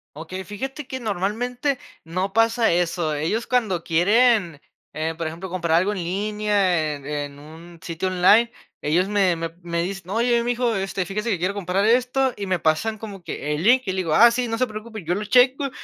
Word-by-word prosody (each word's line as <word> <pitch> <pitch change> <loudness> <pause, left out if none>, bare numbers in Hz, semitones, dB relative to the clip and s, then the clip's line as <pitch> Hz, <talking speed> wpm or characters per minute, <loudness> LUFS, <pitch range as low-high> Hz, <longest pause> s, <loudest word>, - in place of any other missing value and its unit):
Okey, 165 +5 -7
fíjate 265 - -6
que 260 - -5
normalmente, 240 +6 -2 0.3
no 185 +4 -3
pasa 225 +1 +3
eso. 170 -2 0
Ellos 165 +10 -1
cuando 215 -9 0
quieren, 195 - +3 0.3
eh, 160 +1 -2
por 165 -1 -3
ejemplo, 170 +4 -7
comprar 170 -3 +1
algo 185 +4 +2
en 195 - -4
línea, 195 -4 0
en 140 -1 -12
en 145 -1 -4
un 165 +3 -13
sitio 170 +2 -3
online, 185 +6 +4 0.3
ellos 170 +5 +1
me 195 -4 +2
me 165 0 -4
me 170 0 -2
dicen: 185 0 -6
"Oye, 235 +3 +2
mijo, 240 -1 0
este, 190 -1 -2
fíjese 210 +5 -3
que, 195 - +1
quiero 185 +4 -1
comprar 195 0 -1
esto" 250 +2 +2
y 200 -1 -5
me 185 - +1
pasan 165 +8 0
como 205 -3 -8
que 150 -1 -4
el 150 - -2
link, 250 +6 +4
y 190 - -1
le 190 - -4
digo: 165 -4 0
"Ah, 235 +5 +8
sí, 245 0 -1
no 225 - -2
se 255 - +2
preocupe, 215 -2 -8
yo 175 - 0
lo 205 +3 -2
checo, 255 +5 +4
195 Hz, 200 wpm, -23 LUFS, 170-230 Hz, 0.3 s, Ah